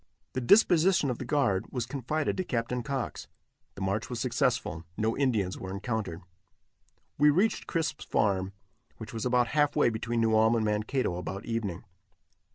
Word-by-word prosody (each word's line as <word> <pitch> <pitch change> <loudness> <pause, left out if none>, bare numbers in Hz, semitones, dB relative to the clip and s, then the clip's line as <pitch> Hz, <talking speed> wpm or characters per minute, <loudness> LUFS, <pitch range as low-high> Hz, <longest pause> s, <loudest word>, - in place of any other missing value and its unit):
The 130 - -2
disposition 175 - +4
of 120 - -5
the 130 - -5
guard 120 -9 +1
was 125 -3 -2
confided 145 +3 -2
to 185 - 0
Captain 120 -4 -2
Cox. 130 +1 -4 0.5
The - - -8
march 100 +3 -1
was 120 -2 -4
successful; 120 -9 0
no 110 +1 0
Indians 110 -9 0
were 95 - -6
encountered. 100 -4 -3 1.0
We 150 +1 +6
reached 190 +9 +1
Crisp's 165 -2 -2
farm, 95 -2 +1 0.5
which 110 -1 -9
was 115 +2 -2
about 125 -1 +2
half 145 -1 +2
way 120 - +4
between 115 +1 -2
New 110 -1 +3
Ulm 110 +1 +4
and 110 -1 +1
Mankato, 105 -1 0
about 95 +3 -5
evening. 110 -7 -3
115 Hz, 165 wpm, -29 LUFS, 105-135 Hz, 1.0 s, We